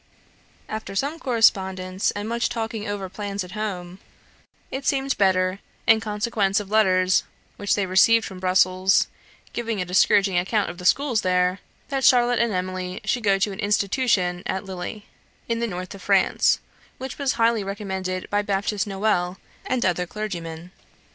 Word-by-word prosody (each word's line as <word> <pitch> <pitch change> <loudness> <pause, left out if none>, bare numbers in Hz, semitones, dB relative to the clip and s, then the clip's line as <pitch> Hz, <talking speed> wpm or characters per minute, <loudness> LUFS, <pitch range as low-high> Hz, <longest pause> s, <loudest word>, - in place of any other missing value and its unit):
After 220 -2 -6
some 285 +10 -1
correspondence 190 - +1
and 205 +1 -4
much 235 +1 0
talking 225 -2 -4
over 205 -2 -3
plans 200 +1 -4
at 180 - -11
home, 190 -4 -5 0.7
it 270 +1 -4
seemed 270 0 0
better, 185 -1 +2 0.3
in 225 0 +6
consequence 210 -2 0
of 205 -1 -8
letters 185 -4 +4 0.4
which 205 - +1
they 200 - 0
received 220 +5 +4
from 190 -2 -8
Brussels 185 +1 +3 0.5
giving 230 -3 -2
a 180 - -1
discouraging 190 +1 +3
account 195 +1 0
of 175 - -13
the 180 - -8
schools 255 +1 +3
there, 180 +1 +1 0.3
that 270 -1 -1
Charlotte 245 -2 +5
and 235 -1 +2
Emily 185 -1 -3
should 245 -2 0
go 200 -2 +3
to 195 +1 0
an 195 - -8
institution 200 -3 +1
at 190 +1 -3
Lille, 190 +3 -6 0.4
in 230 -1 -1
the 235 - 0
north 185 -1 -6
of 200 - -11
France, - - +3 0.4
which 265 +2 -7
was 275 -2 +1
highly 230 -2 +2
recommended 190 -2 -4
by 205 0 +2
Baptist 200 +1 -1
Noel, 190 -2 0 0.3
and 255 -2 0
other 180 -1 0
clergymen. 175 -5 -6
200 Hz, 160 wpm, -24 LUFS, 185-225 Hz, 0.7 s, in